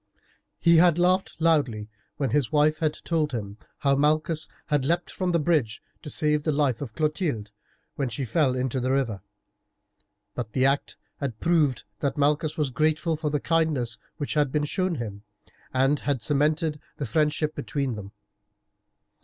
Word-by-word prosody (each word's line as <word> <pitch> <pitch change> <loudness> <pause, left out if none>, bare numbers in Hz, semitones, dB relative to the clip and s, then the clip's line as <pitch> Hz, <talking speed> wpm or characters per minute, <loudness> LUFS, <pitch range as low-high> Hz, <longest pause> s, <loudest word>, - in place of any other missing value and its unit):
He 170 -1 +5
had 175 -1 +5
laughed 180 0 +2
loudly 140 -10 +2 0.3
when 135 -5 -1
his 135 -4 +1
wife 155 +1 +3
had 155 -2 0
told 155 -4 0
him 105 -2 -5 0.2
how 140 -1 +2
Malchus 155 +2 +1 0.2
had 145 -3 +1
leaped 170 +5 0
from 185 -1 -1
the 170 - +3
bridge 150 -8 +1 0.2
to 150 - -8
save 150 -1 +1
the 155 - 0
life 140 -5 +1
of 120 -6 -6
Clotilde 150 - -1 0.5
when 135 -3 -1
she 130 +4 -3
fell 130 +2 +2
into 130 0 -1
the 130 +1 0
river. 120 -8 0 1.1
But 115 -3 -5
the 130 0 +3
act 140 +1 +1 0.2
had 130 -6 -4
proved 155 -7 +2 0.2
that 140 +1 -1
Malchus 150 +1 +1
was 150 -4 0
grateful 155 +4 +1
for 155 -1 -2
the 150 0 0
kindness 150 -8 0 0.2
which 145 -3 -3
had 145 -3 +2
been 150 +1 +1
shown 185 +2 -1
him, 105 -6 -5 0.5
and 135 +3 +2
had 140 -6 -1
cemented 150 +3 +1 0.2
the 145 - -3
friendship 150 +3 +1
between 140 -4 -2
them. 100 -2 -8
150 Hz, 165 wpm, -26 LUFS, 130-155 Hz, 1.1 s, He